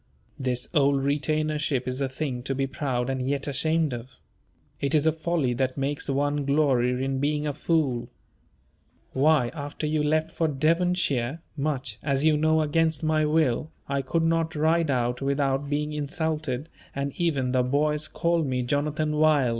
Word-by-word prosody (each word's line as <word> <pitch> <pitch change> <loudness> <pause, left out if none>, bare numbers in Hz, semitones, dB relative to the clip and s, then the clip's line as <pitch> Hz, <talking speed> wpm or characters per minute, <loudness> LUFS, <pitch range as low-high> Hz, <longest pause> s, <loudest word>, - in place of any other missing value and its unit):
This 125 -2 -2
old 140 -3 +3
retainership 150 -2 0
is 130 +2 -3
a 135 - 0
thing 130 -2 -3
to 135 - -1
be 135 +1 0
proud 130 -2 -2
and 130 -1 -2
yet 140 -1 -1
ashamed 155 +1 +1
of. 120 +2 -8 0.6
It 140 +3 +1
is 150 0 +3
a 160 - +5
folly 160 -5 -1
that 130 +2 -1
makes 140 +1 -2
one 145 +1 0
glory 135 -3 +2
in 135 0 -1
being 150 +1 0
a 145 - -1
fool. 145 -6 0 1.0
Why, 140 -2 +3
after 145 0 -5
you 150 0 +1
left 155 +2 +1
for 165 - 0
Devonshire 155 -3 +1 0.2
(much, 135 -6 -3
as 140 0 0
you 155 -1 +5
know, 155 +1 +3
against 160 0 +1
my 155 0 +2
will), 150 -2 +1 0.2
I 140 0 0
could 165 +5 0
not 165 0 +1
ride 160 +1 +2
out 125 -1 0
without 140 0 0
being 150 +1 -1
insulted, 150 -2 -2 0.3
and 140 0 -2
even 140 -7 0
the 130 0 +3
boys 150 +4 +1
called 170 -2 0
me 125 -1 -1
"Jonathan 150 +3 -1
Wild." 150 -5 +4
145 Hz, 165 wpm, -26 LUFS, 135-155 Hz, 1.0 s, a